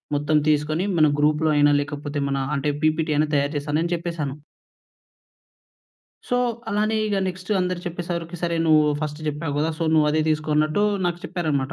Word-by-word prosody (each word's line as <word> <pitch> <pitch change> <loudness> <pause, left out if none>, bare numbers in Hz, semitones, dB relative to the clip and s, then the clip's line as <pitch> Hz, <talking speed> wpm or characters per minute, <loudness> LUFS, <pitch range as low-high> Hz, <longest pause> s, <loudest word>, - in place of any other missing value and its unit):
మొత్తం 145 +1 +1
తీసుకొని, 155 +3 +1
మన 155 -1 +5
గ్రూప్‌లో 155 +1 +2
అయినా, 145 0 +5
లేకపోతే 145 0 -5
మనా 135 -1 -1
అంటే, 145 +1 0
పీపీటీ 155 0 +1
అయినా 155 - +2
తయారు 145 +2 +1
చేస్తానని 155 +4 -1
చెప్పేశాను. 165 -5 -4 1.9
సో, 245 - +1 0.3
అలానే 215 +2 +1
ఇగ 205 - -1
నెక్స్ట్ 185 +1 -7
అందరు 180 -1 -1
చెప్పే 175 0 -4
సరికి, 170 0 -4
సరే 170 -1 0
నువ్వూ 155 -2 +4
ఫస్ట్ 150 0 -4
జెప్పావు 150 0 -3
గదా! 160 +2 +1
సో, 165 - -1
నువ్వదే 155 0 +3
తీసుకో 155 0 0
అన్నట్టూ 155 +6 +2 0.2
నాకు 175 0 -1
చెప్పారనమాట. 145 -6 -2
155 Hz, 160 wpm, -23 LUFS, 150-170 Hz, 1.9 s, మన